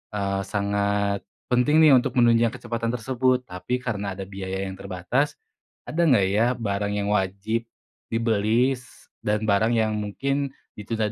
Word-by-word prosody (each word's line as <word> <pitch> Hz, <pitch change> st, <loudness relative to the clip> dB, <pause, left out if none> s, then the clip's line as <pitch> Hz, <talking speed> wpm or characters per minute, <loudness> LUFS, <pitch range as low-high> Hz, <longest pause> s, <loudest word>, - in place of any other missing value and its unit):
eee, 100 Hz, -1 st, -1 dB
sangat 100 Hz, 0 st, 0 dB, 0.3 s
penting 145 Hz, +6 st, +4 dB
nih 155 Hz, -, +8 dB
untuk 125 Hz, -, -1 dB
menunjang 115 Hz, -2 st, +4 dB
kecepatan 115 Hz, 0 st, -3 dB
tersebut, 130 Hz, +1 st, +1 dB
tapi 90 Hz, +5 st, -4 dB
karena 100 Hz, -5 st, -2 dB
ada 95 Hz, -, -5 dB
biaya 95 Hz, 0 st, -5 dB
yang 95 Hz, -1 st, -5 dB
terbatas, 100 Hz, +10 st, -1 dB, 0.5 s
ada 170 Hz, +2 st, 0 dB
nggak 115 Hz, -10 st, +4 dB
ya, 105 Hz, +4 st, +3 dB
barang 100 Hz, -2 st, -2 dB
yang 100 Hz, 0 st, -1 dB
wajib 105 Hz, +3 st, -1 dB, 0.4 s
dibeli, 115 Hz, +3 st, 0 dB
dan 105 Hz, +1 st, 0 dB
barang 110 Hz, +2 st, +3 dB
yang 110 Hz, -1 st, +1 dB
mungkin, 135 Hz, +7 st, -2 dB, 0.3 s
ditunda 110 Hz, 0 st, -2 dB
110 Hz, 140 wpm, -24 LUFS, 100-125 Hz, 0.5 s, nih